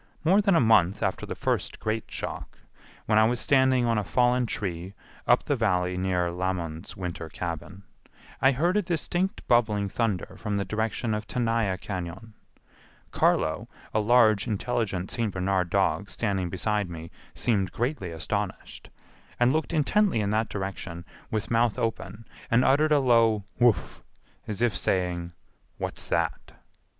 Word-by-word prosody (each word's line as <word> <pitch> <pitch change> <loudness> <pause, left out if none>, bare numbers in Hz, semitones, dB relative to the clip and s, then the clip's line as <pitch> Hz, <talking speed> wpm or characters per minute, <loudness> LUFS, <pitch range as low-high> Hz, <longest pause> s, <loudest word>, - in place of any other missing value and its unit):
More 190 +6 +5
than 195 -3 +3
a - - +5
month 105 -5 +4
after - - -1
the - - -4
first - - -2
great 110 +1 -2
shock, - - -6 0.5
when 110 0 +4
I - - +6
was 120 +1 +1
standing 130 -3 +4
on 115 -2 +2
a - - -2
fallen 125 +3 +2
tree 95 -2 -4 0.3
up - - +4
the 145 - 0
Valley 90 -6 +1
near 90 -2 0
Lamon's 85 -3 -4
winter 85 -3 -5
cabin, 85 +4 -6 0.6
I 135 - +6
heard 170 +8 +1
a - - +3
distinct 175 +3 -2
bubbling 105 -4 +3
thunder 105 -3 -2
from 105 -2 -2
the 100 0 -1
direction 110 +2 -1
of 105 0 -3
Tenaya 115 -5 0
Cañon 95 +3 -6 0.8
Carlo, - - +1 0.3
a 110 - +2
large 110 -1 +4
intelligent 105 -4 -2
St. 115 -3 -1
Bernard 90 -1 0
dog 100 +2 +1
standing 95 -5 -1
beside 105 +1 -1
me 85 -1 -8 0.2
seemed 100 -6 0
greatly 120 - -2
astonished, 80 -1 -4 0.5
and 120 +2 +4
looked 160 +1 -1
intently 170 - +2
in 100 -1 0
that 110 0 0
direction 95 -4 -5 0.2
with 110 +1 -3
mouth 115 -1 +2
open 110 -1 -3 0.2
and 115 +2 +4
uttered 150 +4 +3
a 150 - +6
low 115 -5 +3 0.2
Wouf! 120 -6 +2 0.5
as 110 +2 -2
if 115 -6 +2
saying, 90 -2 -1 0.5
"What's - - -5
that?" - - -1
110 Hz, 150 wpm, -27 LUFS, 95-120 Hz, 0.8 s, I